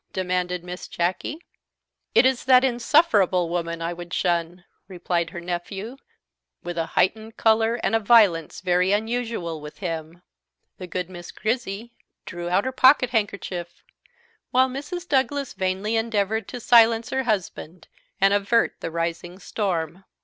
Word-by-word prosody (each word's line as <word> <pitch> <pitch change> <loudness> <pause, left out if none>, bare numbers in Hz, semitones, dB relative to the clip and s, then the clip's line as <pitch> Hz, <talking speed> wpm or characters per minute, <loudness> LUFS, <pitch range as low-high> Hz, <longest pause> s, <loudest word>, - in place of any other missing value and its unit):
demanded 180 -1 -2
Miss 180 0 -7
Jacky. 185 - -3 0.7
"It - - +6
is 260 -1 +1
that 255 0 +6
insufferable 235 - +3
woman 170 -1 -3
I 170 +1 -2
would 175 0 -7
shun," 175 0 -1 0.2
replied 175 -2 -2
her 175 0 -7
nephew, 185 +6 -5 0.7
with 175 0 -5
a 165 - -1
heightened 220 +3 +1
colour 225 +1 +3
and - - 0
a - - +3
violence 205 -7 +3
very 180 0 +2
unusual 220 -7 -2
with 150 0 -10
him. 165 -1 -6 0.6
The 185 - -7
good 180 0 -3
Miss 175 -2 -10
Grizzy 230 0 -3 0.3
drew 175 -1 -5
out 185 +3 +2
her 260 - -1
pocket 260 -1 +5
handkerchief, 200 -6 -3 0.7
while 260 +1 +4
Mrs. 295 +7 -6
Douglas 280 -1 0
vainly 190 +4 -1
endeavoured 220 -1 -1
to 250 - -7
silence 230 -1 +4
her 265 - 0
husband, 185 -7 -3 0.3
and 195 +1 +4
avert 205 +3 +2
the - - -4
rising 170 +2 -4
storm. 180 -3 -3
195 Hz, 140 wpm, -24 LUFS, 175-230 Hz, 0.7 s, It